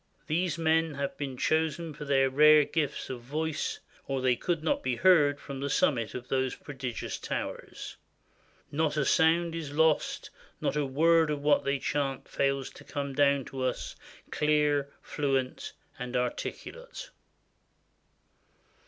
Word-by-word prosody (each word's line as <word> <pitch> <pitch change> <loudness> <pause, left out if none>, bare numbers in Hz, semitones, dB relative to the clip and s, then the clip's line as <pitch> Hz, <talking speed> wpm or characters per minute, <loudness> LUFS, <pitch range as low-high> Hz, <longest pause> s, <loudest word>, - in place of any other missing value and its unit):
These 165 +1 0
men 160 -1 +2
have 140 0 -3
been 135 -3 -5
chosen 160 +2 0
for 150 - -8
their 135 -1 +3
rare 150 +2 +6
gifts 150 -4 -2
of 125 -2 -6
voice, 155 +5 -3 0.3
or 135 -1 -1
they 130 -1 +2
could 165 +4 -2
not 160 - +1
be 130 -1 -1
heard 145 -3 +4
from 140 -1 -7
the 140 +1 -2
sum 145 - +3
mit 115 -4 -4
of 125 0 -6
those 130 -1 0
prodigious 130 -5 -5
towers. - - -5 0.7
Not 155 0 0
a 145 - +2
sound 165 +1 +3
is 160 -4 -5
lost; 160 0 +1 0.3
not - - -1
a 150 -2 0
word 160 +3 +4
of 145 -1 -2
what 150 0 +3
they 140 0 +1
chant 135 -1 -2
fails 135 -1 -1
to - - -14
come 140 -1 -4
down 140 -1 +3
to 135 0 -6
us, 130 -1 -2 0.4
clear, 150 -2 +2
fluent, 135 -3 -2 0.3
and 125 0 -5
articulate." 475 - -4
145 Hz, 150 wpm, -29 LUFS, 135-160 Hz, 0.7 s, rare